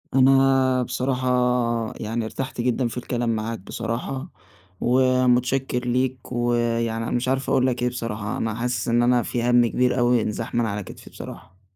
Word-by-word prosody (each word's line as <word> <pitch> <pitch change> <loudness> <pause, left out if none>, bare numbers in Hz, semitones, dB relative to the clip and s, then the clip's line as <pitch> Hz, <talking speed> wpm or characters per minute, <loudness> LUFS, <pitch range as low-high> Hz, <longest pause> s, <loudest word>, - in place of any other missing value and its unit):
أنا 135 -1 +4
بصراحة 130 +1 -2 0.7
يعني 115 +1 -3
ارتحت 130 +2 -4
جدًا 125 0 +1
في 115 - -6
الكلام 120 -2 -1
معاك 110 +1 -3
بصراحة، 115 - -4 0.5
ومتشكر 130 0 +2
ليك، 125 0 -1
ويعني 115 -1 0
أنا 115 - -4
مش 125 +1 -1
عارف 130 +1 0
أقول 130 - +3
لك 125 -1 -1
إيه 125 - +2
بصراحة. 110 -4 -4
أنا 110 -1 -2
حاسس 120 0 -2
إن 120 +1 +3
أنا 120 0 +3
في 120 - -2
هَمّ 120 0 +4
كبير 125 +2 +1
أوي 120 -1 +3
انزاح 110 +2 -4
من 120 -1 +2
على 105 -1 -3
كتفي - - -12
بصراحة. 95 +1 -11
120 Hz, 165 wpm, -23 LUFS, 115-130 Hz, 0.7 s, أنا